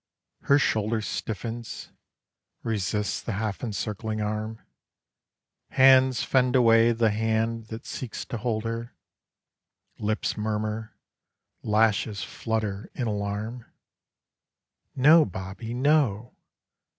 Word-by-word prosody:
Her 140 - +5
shoulder 110 -4 +1
Stiffens; 115 +2 -5 0.7
resists 105 -2 -1
the 115 - -4
half 105 +2 -3
encircling 110 0 -3
arm. 110 +1 -3 1.1
Hands 130 -1 +5
fend 130 -1 +2
away 115 -2 +6
the 115 -1 +2
hand 110 +1 -1
that 110 +1 -8
seeks 125 -4 -6
to 120 - -5
hold 110 -1 -2
her. 115 +1 -5 1.0
Lips 110 +1 -1
murmur. 110 0 -3 0.6
Lashes 105 -1 +1
flutter 110 -3 -3
in 125 - -2
alarm. 105 +3 -3 1.3
"No, 155 +5 +7
Bobbie. 95 - -6
No." 125 -5 +2
110 Hz, 95 wpm, -26 LUFS, 105-120 Hz, 1.3 s, No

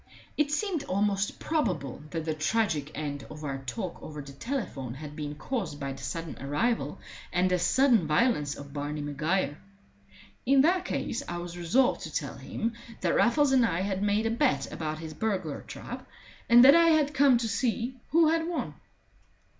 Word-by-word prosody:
It 300 -1 +1
seemed 325 0 -1
almost 200 +1 0
probable 180 - -1
that 165 -1 -4
the 160 - 0
tragic 155 -2 0
end 145 -2 -4
of 155 0 -9
our 135 -2 -3
talk 135 +7 -5
over 150 -1 -8
the 140 -1 -8
telephone 140 - -4
had 150 +1 -8
been 150 -1 -5
caused 175 - -4
by 140 -1 -3
the - - -11
sudden 165 -2 -5
arrival 145 - 0 0.3
and 180 +1 +2
as 180 - +1
sudden 235 - +4
violence 150 - +2
of 140 -1 -10
Barney 150 +1 -3
Maguire. 145 +1 -1 0.8
In 270 +1 +5
that 355 +5 +3
case - - -2
I 175 - -3
was 175 0 -6
resolved 225 +10 +2
to - - -6
tell - - -3
him 230 +1 -3 0.3
that - - +1
Raffles 285 +3 +4
and 260 -2 +5
I 180 -6 +1
had 190 0 -1
made 205 +2 +1
a 225 - +1
bet 255 +3 +1
about 155 -1 -3
his 160 0 -7
burglar 185 -5 -2
trap, - - -8 0.4
and 240 +1 +9
that 275 - +10
I 335 0 +6
had 305 -3 +3
come 280 -3 +5
to 235 -1 -1
see 240 +3 -1
who 330 0 +5
had 325 0 +1
won. 345 - -3
185 Hz, 180 wpm, -28 LUFS, -, 0.8 s, that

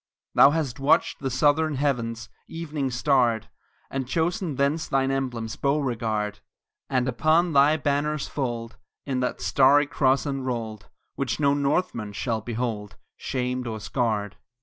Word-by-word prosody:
Thou - - +8
hast 145 -4 -2
watched 135 +2 +2
the 135 - -2
southern 145 +4 +2
heavens 120 -5 -1 0.2
Evening 155 -4 -3
starred, 120 -3 +1 0.4
And 135 -2 -3
chosen 170 +2 -1
thence 140 +4 0
thine 135 0 +1
emblems, 120 -5 -3
Beauregard; 115 -7 -1 0.5
And 130 -1 +1
upon 155 +7 +2
thy 145 +3 +5
banner's 145 +1 -1
fold 120 -4 -4 0.3
Is 130 -2 -1
that 125 0 -2
starry 140 +2 +4
cross 135 -1 +1
enrolled, 120 -7 -4 0.2
Which - - -2
no 140 -1 +3
Northman 140 - -1
shall 110 +1 -2
behold 110 -3 -4 0.2
Shamed 125 -1 -3
or 110 -1 -4
scarred. 105 -2 -2
135 Hz, 130 wpm, -25 LUFS, 115-145 Hz, 0.5 s, Thou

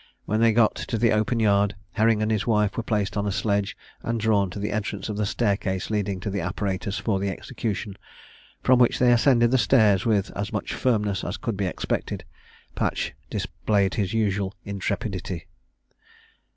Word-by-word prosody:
When 110 +2 0
they 115 0 +5
got 110 -1 +4
to 115 - -3
the 115 +1 +3
open 110 +2 +1
yard, 100 -1 +3 0.2
Herring 110 0 +2
and 110 - 0
his 110 0 0
wife 105 -3 +2
were - - -1
placed 105 -3 -1
on 105 0 0
a - - 0
sledge, 100 -1 0 0.2
and 115 0 -2
drawn 105 -3 +2
to 90 - -8
the 105 +1 -2
entrance 105 -1 -3
of 105 - -3
the 105 -1 0
stair 100 -2 +1
case 95 0 -3
leading 100 -3 -1
to 100 - -3
the 100 -1 -2
apparatus 95 +2 -2
for 100 -4 0
the 100 +1 -1
execution, 105 -1 -4 0.6
from 130 -1 +5
which 120 - +4
they 125 -1 +4
ascended 120 -1 +4
the 130 - +4
stairs 110 -6 +4
with 105 -4 +1
as 100 +2 -3
much 110 -2 -3
firmness 105 -5 0
as - - -3
could 115 - -3
be 100 -1 -1
expected. - - -3 0.5
Patch - - -1 0.2
displayed 100 -2 0
his 100 -4 -1
usual 100 -3 0
intrepidity. 100 -2 -3
105 Hz, 185 wpm, -25 LUFS, 100-110 Hz, 0.6 s, they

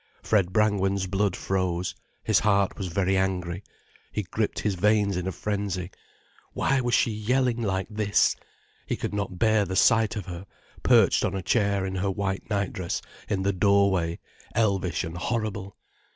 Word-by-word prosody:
Fred 100 -4 +2
Brangwen's 100 -2 +2
blood 95 0 0
froze, 95 -2 -1 0.3
his 110 -3 +3
heart 100 -2 +2
was 95 - -4
very 95 +2 +1
angry. 95 -1 -1 0.5
He 105 - -2
gripped 105 +4 -2
his 105 - 0
veins 105 +1 +2
in 90 +1 -2
a - - -1
frenzy. 100 -2 -3 0.6
Why 135 -1 +1
was 120 0 +1
she 115 - +2
yelling 120 +3 0
like 95 -3 -1
this? 105 -2 +2 0.5
He - - 0
could - - -4
not 100 -3 -3
bear 110 +2 +3
the 95 -1 -4
sight 110 +1 +4
of 105 - -4
her, 90 +1 -8 0.3
perched - - +4
on - - 0
a 95 - -3
chair 100 -3 +1
in 95 - -3
her 95 +2 0
white 95 0 -3
nightdress 100 -4 -2 0.3
in 95 -2 0
the 100 +1 +1
doorway, 95 -3 +2 0.4
elvish 100 -6 +1
and 80 +1 -6
horrible. 100 0 -3
100 Hz, 165 wpm, -26 LUFS, 95-105 Hz, 0.6 s, sight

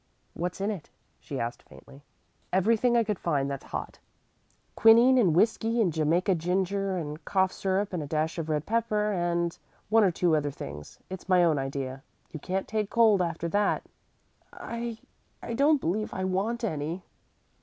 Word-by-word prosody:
"What's 180 +2 -4
in 200 +2 0
it?" 190 -7 -7 0.3
she 140 - -6
asked 120 0 -4
faintly. 140 +1 -16 0.5
"Everything 230 +6 +3
I 230 - +4
could 210 -4 -2
find 145 -5 0
that's 140 - -6
hot - - -6 0.8
quinine 235 +3 +6
and 180 -9 +3
whisky 225 +4 +2
and 185 -8 +2
Jamaica 165 +5 +2
ginger 190 +3 -1
and 150 -2 -5
cough 190 -1 +1
syrup 195 +1 -1
and 175 - -2
a 145 - -5
dash 155 +2 -1
of 160 -1 -4
red 150 0 -1
pepper, 215 -1 0
and 175 -2 0 0.3
one 225 +1 +5
or 195 - +5
two 170 -1 +2
other 145 -1 0
things. 75 - -9
It's 190 0 -8
my 180 -1 +5
own 160 -4 +3
idea. 135 -1 -4 0.3
You 155 - -7
can't 190 +5 -3
take 215 -2 -1
cold 220 -5 +4
after 170 -1 -2
that." 205 +3 +1 0.7
"I 235 -1 -5 0.5
I 235 - -4
don't 285 +4 +4
believe 215 +1 -2
I 190 - -2
want 200 +6 -1
any." 165 -2 -3
185 Hz, 170 wpm, -28 LUFS, 160-215 Hz, 0.8 s, quinine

